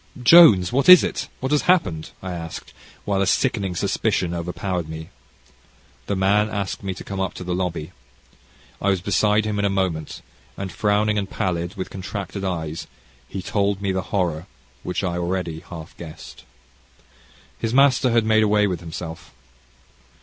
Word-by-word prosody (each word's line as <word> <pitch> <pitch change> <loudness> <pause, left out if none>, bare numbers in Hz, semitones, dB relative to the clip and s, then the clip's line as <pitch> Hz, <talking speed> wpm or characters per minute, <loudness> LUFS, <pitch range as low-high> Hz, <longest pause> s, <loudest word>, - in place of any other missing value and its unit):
"Jones, 120 - +7
what 140 +5 +3
is 180 -1 +11
it? - - -3
what 130 +2 -2
has 150 - +3
happened?" 90 - +2
I 95 - -4
asked, 85 -2 -7 0.3
while 100 -1 0
a 100 - +1
sickening 100 -6 0
suspicion 85 +1 0
overpowered 90 0 -3
me. 80 0 -7 1.0
The 100 - -1
man 100 +3 +2
asked 100 -3 -3
me 95 -1 -4
to - - -9
come 100 -1 -6
up 95 -1 -2
to - - -7
the 90 0 -3
lobby. 90 -4 -3 0.9
I 100 - +1
was 95 -2 +2
beside 105 +3 +2
him 105 -1 -2
in - - 0
a - - +2
moment, 95 -5 -2 0.3
and, 95 -2 -5
frowning 105 +1 +1
and 100 -1 -4
pallid, 90 -2 -2
with 95 -2 -5
contracted 100 0 -6
eyes, 80 -4 -3 0.4
he 95 -1 -5
told 100 -1 0
me 100 -1 -1
the 95 0 -1
horror 85 -3 -1 0.3
which 90 - -3
I 90 -2 -1
already 85 -2 -2
half 80 -2 -10
guessed. 80 -3 -11 1.1
His 115 - -2
master 130 -1 +4
had 115 -2 +2
made 110 0 +4
away 105 -1 +3
with 90 -4 -2
himself. 80 -1 -8
95 Hz, 165 wpm, -22 LUFS, 85-105 Hz, 1.1 s, is